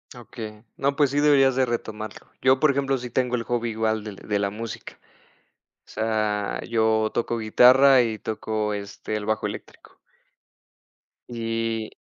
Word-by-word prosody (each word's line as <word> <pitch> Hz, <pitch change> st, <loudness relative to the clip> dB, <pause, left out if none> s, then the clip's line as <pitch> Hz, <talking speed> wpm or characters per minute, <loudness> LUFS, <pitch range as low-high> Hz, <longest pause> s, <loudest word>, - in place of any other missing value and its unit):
Okey. 110 Hz, -3 st, -9 dB
No, 140 Hz, +1 st, 0 dB
pues 145 Hz, -1 st, +3 dB
sí 145 Hz, -, +1 dB
deberías 140 Hz, -3 st, +4 dB
de 130 Hz, -, +3 dB
retomarlo. 110 Hz, -3 st, -6 dB
Yo, 130 Hz, 0 st, +4 dB
por 155 Hz, -, +5 dB
ejemplo, 135 Hz, -1 st, 0 dB
sí 125 Hz, -1 st, -7 dB
tengo 125 Hz, 0 st, 0 dB
el 115 Hz, -, -2 dB
hobby 120 Hz, -1 st, -2 dB
igual 110 Hz, -1 st, -1 dB
del 105 Hz, -2 st, -7 dB
de 100 Hz, +1 st, -3 dB
la 100 Hz, 0 st, 0 dB
música. 110 Hz, +2 st, -8 dB, 0.9 s
O -, -, -51 dB
sea, 110 Hz, -2 st, -1 dB
yo 110 Hz, -1 st, +2 dB
toco 120 Hz, 0 st, -1 dB
guitarra, 130 Hz, +4 st, +6 dB
y 110 Hz, -2 st, -3 dB
toco, 110 Hz, -1 st, -3 dB
este, 100 Hz, +1 st, -6 dB
el 105 Hz, -1 st, -3 dB
bajo 110 Hz, 0 st, -1 dB
eléctrico. -, -, -11 dB, 1.3 s
Y 115 Hz, -1 st, -3 dB
115 Hz, 155 wpm, -24 LUFS, 110-125 Hz, 1.3 s, guitarra